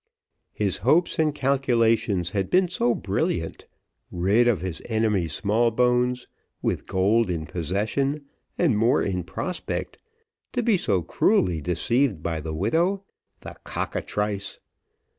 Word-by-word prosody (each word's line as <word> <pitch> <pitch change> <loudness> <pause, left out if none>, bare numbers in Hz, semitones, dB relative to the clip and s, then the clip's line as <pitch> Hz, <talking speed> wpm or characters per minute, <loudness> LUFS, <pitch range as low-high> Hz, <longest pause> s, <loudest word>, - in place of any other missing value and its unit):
His 100 -2 -1
hopes 155 - +2
and 155 -2 +2
calculations 115 - +1
had 95 -2 -1
been 185 0 +3
so 120 -8 +1
brilliant - - -2 0.4
rid 100 +7 +2
of 115 -7 +2
his 95 -2 -4
enemy 110 -6 +1
Smallbones 120 +7 +1 0.3
with - - -2
gold 100 +3 +2
in 80 -3 -2
possession, 110 - -2 0.3
and 155 -10 +3
more 115 +3 +3
in 90 -2 -1
prospect, 180 - -4 0.5
to 245 - 0
be 225 -2 +3
so 100 - 0
cruelly 85 0 +2
deceived 95 - 0
by 80 -2 -2
the 80 - -5
widow 170 - +1 0.4
the - - -9
cockatrice! 100 -1 -3
110 Hz, 120 wpm, -25 LUFS, 95-130 Hz, 0.5 s, been